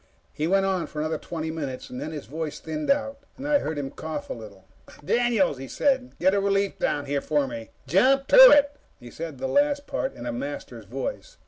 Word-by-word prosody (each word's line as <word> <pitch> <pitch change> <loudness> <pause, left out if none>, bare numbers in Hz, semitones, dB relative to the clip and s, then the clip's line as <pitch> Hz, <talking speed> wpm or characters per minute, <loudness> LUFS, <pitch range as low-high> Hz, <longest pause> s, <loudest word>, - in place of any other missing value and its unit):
He 155 - -1
went 195 +2 +3
on 190 -3 0
for - - -12
another 155 +1 -1
twenty 160 -1 -5
minutes. 140 -5 -5
Then 125 +5 -5
his 150 -3 -6
voice 155 +1 -5
thinned 155 - -5
out, 275 0 +1 0.2
and 275 +2 -6
I 295 -1 +4
heard 155 - -4
him 135 -2 -4
cough 155 -1 -6
a - - 0
little. 100 -4 -12 0.4
"Daniels," 230 - +2
he 135 - -7
said, 265 - 0
"get 190 +2 +3
a 200 - +3
relief 200 0 0
down 145 -1 0
here 140 0 -1
for 145 -2 +1
me. 115 -3 -7 0.2
Jump 255 - +3
to - - +10
it!" 290 - +5 0.2
He 120 -1 -12
said 160 -3 -7
the 130 - -4
last 285 - +2
part 265 - -3
in 120 - -8
a 120 - -3
Master's 120 -3 -6
voice. 130 +6 -6
160 Hz, 215 wpm, -25 LUFS, -, 0.4 s, to